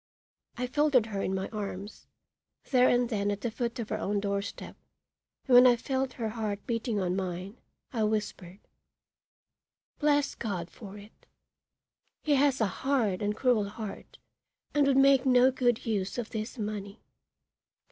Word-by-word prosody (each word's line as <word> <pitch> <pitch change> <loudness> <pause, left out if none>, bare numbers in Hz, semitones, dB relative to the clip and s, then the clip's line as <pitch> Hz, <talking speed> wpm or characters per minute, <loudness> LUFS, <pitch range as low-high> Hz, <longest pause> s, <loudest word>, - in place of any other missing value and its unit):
I 250 - -1
folded 275 -2 +3
her 200 -3 -4
in 190 - -1
my 190 0 -2
arms, 205 -1 -6 0.6
there 255 -1 +5
and 245 0 +3
then 205 -3 -1
at 205 0 -3
the 235 - -2
foot 235 +2 -3
of 230 -3 -5
her - - -2
own 205 +1 -1
doorstep, 200 0 -4 0.7
and 265 - +1
when 250 +1 +9
I 245 - +6
felt 265 +2 -2
her 225 -3 -3
heart 215 -2 -4
beating 230 -2 -1
on 180 -1 0
mine, 185 +3 -4 0.3
I 230 - -1
whispered: 210 -3 -3 1.4
"Bless 290 -1 +2
God 185 -6 -4
for 205 -2 -10
it! 205 +2 -16 1.0
He 300 - +2
has 275 -1 +3
a 220 - +3 0.2
hard 240 -9 +1
and 210 +1 -1
cruel 230 -6 +2
heart, 210 -1 -8 0.6
and 290 -1 +3
would 270 -1 +3
make 270 -1 +6
no 250 0 +5
good 245 -3 0
use 205 -3 -2
of 240 -2 -4
this 220 +3 -5
money. 205 -1 -5
220 Hz, 155 wpm, -29 LUFS, 200-250 Hz, 1.4 s, when